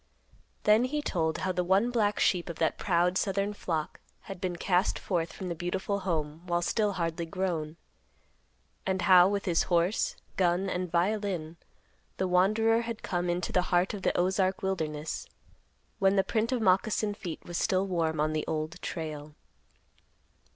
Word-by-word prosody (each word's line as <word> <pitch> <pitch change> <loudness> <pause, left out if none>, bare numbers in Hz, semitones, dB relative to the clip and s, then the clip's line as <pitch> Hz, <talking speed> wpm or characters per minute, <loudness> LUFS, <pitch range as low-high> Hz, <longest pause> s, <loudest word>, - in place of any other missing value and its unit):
Then 215 +3 +5
he 295 +3 -2
told 160 - 0
how 185 - -1
the 180 0 0
one 195 +7 +2
black 210 -4 +1
sheep 180 -2 +2
of 170 - -5
that 160 - 0
proud 180 0 +2
southern 200 +1 0
flock 160 -6 -3 0.2
had 190 -2 -9
been 180 -2 -2
cast 180 +2 +1
forth 170 -3 -2
from 185 - -7
the 175 - -2
beautiful 185 +4 -2
home 160 -4 -2
while 175 0 0
still 210 +2 +1
hardly 170 -2 -2
grown; 165 -3 -2 1.1
and 190 -1 -1
how, 180 0 +7
with 200 -1 -2
his 170 -3 +2
horse, 175 +3 +1 0.2
gun 180 +1 +2
and 180 -1 -3
violin, 180 -3 -1 0.6
the 190 - 0
wanderer 215 +6 +3
had 230 -1 -6
come 175 -1 -1
into 175 +1 -1
the 180 - +3
heart 180 +2 +2
of 205 - -5
the - - 0
Ozark 190 +1 +1
wilderness, 160 -5 -3 0.7
when 195 -1 +4
the 195 - +4
print 225 +3 0
of 245 -3 0
moccasin 205 +2 +2
feet 175 -5 -7
was 175 -1 -3
still 190 -2 +1
warm 165 -4 -1
on 155 +1 +1
the 155 - -2
Old 155 +2 -3
Trail. 155 -2 -5
180 Hz, 165 wpm, -29 LUFS, 170-195 Hz, 1.1 s, how